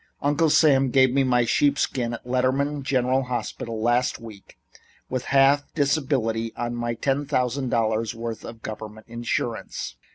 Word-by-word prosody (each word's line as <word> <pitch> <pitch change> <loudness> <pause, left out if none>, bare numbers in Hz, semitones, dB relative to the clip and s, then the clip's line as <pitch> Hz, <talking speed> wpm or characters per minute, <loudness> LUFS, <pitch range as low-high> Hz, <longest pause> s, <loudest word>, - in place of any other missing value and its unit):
"Uncle 145 +3 +2
Sam 135 -4 +4
gave 130 0 +4
me 135 0 +3
my 125 -2 +2
sheepskin 130 -3 +1
at 115 - -12
Letter 130 +1 +2
man 140 +2 -1
General 130 -1 +1
Hospital 120 -2 -4
last 120 +3 +1
week, 110 -4 -13 0.5
with 130 -1 -2
half 140 +1 +3
disability 130 -7 0
on 120 0 -3
my 120 0 -2
ten 135 +4 -1
thousand 125 +1 0
dollars' 110 -1 0
worth 115 -1 -5
of 115 -1 -10
government 110 0 -8
insurance. 115 - -4
125 Hz, 150 wpm, -24 LUFS, 115-135 Hz, 0.5 s, Sam